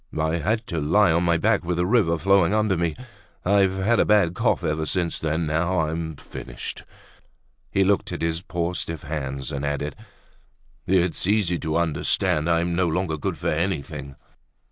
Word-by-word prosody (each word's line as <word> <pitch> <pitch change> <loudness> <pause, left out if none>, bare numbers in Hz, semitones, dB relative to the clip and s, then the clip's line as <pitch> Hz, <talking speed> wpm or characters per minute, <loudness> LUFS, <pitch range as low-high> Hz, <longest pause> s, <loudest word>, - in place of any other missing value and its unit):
I 80 +2 +1
had 110 +8 -1
to 85 -6 -3
lie 85 +5 +4
on 85 +2 +2
my 85 -1 +3
back 80 - +2
with 85 0 -2
the 90 - +1
river 90 -6 +3
flowing 95 +2 +3
under 105 -2 +2
me. 85 -2 -1 0.5
I've 95 0 +3
had 110 +5 +2
a - - +6
bad 100 -5 +3
cough - - +1
ever 80 +1 -1
since 85 -1 -1
then. 80 +1 -1
Now, 80 +3 +1
I'm 80 0 -3
finished." 70 - -8 0.8
He 95 - +2
looked 100 +1 +1
at - - -4
his 80 0 -1
poor 85 -1 -2
stiff 80 -2 -4
hands 70 -2 -4
and 70 -1 -4
added: 70 0 -2 0.9
"It's 90 -1 +1
easy 100 -4 +2
to 80 +1 -1
understand, 80 -1 +1
I'm 85 +1 +1
no 90 0 +2
longer 85 0 -1
good 75 - -3
for - - -2
anything. 75 -5 -3
85 Hz, 175 wpm, -24 LUFS, 80-95 Hz, 0.9 s, a